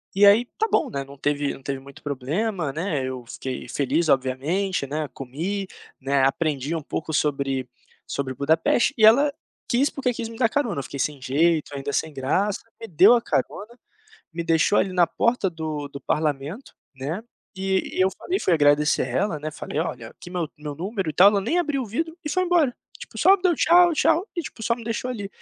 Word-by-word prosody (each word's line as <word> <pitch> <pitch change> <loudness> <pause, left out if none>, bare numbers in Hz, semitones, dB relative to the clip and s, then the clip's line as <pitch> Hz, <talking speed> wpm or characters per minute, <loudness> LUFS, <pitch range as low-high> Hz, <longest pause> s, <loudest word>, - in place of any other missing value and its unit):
E 200 +1 +6
aí 210 +4 +6
tá 445 - +1
bom, - - +2
né, 140 -1 -3
não 140 +1 -13
teve 145 +1 0
não - - -12
teve 135 0 -4
muito 135 0 -14
problema, 150 - -2
né, 160 -4 -2
eu 130 -2 -5
fiquei 130 +1 -6
feliz, 145 +4 0
obviamente, 140 +6 0
né, 150 +1 -3
comi, 170 +11 -4 0.3
né, 135 0 +1
aprendi 145 +1 0
um 160 - -3
pouco 160 +2 -5
sobre 135 -4 0 0.4
sobre 135 -2 -3
Budapeste 155 - +2
e 220 - +6
ela 280 +7 +6 0.4
quis 260 +4 +3
porque 255 -3 -1
quis 230 -1 -4
me 230 - -10
dar 230 -3 +3
carona, 240 - -1
eu 140 - -4
fiquei 140 - -8
sem 145 -2 -2
jeito, 155 +2 +1
ainda 140 0 -4
sem 160 - -1
graça, 185 +10 -1 0.2
me 225 - -6
deu 190 +7 +6
a 240 - +3
carona, 235 +2 -3 0.6
me 170 - -3
deixou 165 +4 +3
ali 190 - +1
na 175 -2 +4
porta 235 0 +1
do 155 -3 -4
do 140 0 -9
parlamento, 150 - -2 0.2
né, 150 +11 -4 0.3
e 190 0 -1
e - - +2
eu 185 - +5
falei 370 +2 -2
fui 180 - +2
agradecer 145 -1 +3
ela, 155 +6 -1
né, 155 +1 -5
falei: - - -4
"Olha, - - -4
aqui 175 - -13
meu 175 -4 -2
meu 150 -1 -6
número 190 +1 -3
e - - -6
tal." 185 +5 +7
Ela 205 -1 +1
nem 320 - 0
abriu 295 -6 0
o - - -6
vidro 320 +10 -3
e 300 - -3
foi 370 +2 +1
embora, 330 -8 +2 0.2
tipo, - - -10
só 390 +1 +6
me 370 - -20
deu 365 -2 +3
tchau 345 +1 +5
tchau, 330 +4 +2
e, - - 0
tipo, 255 -7 -9
só 235 - +1
me 235 - -10
deixou 235 +2 -3
ali, 205 -5 -5
165 Hz, 210 wpm, -24 LUFS, 140-225 Hz, 0.6 s, tal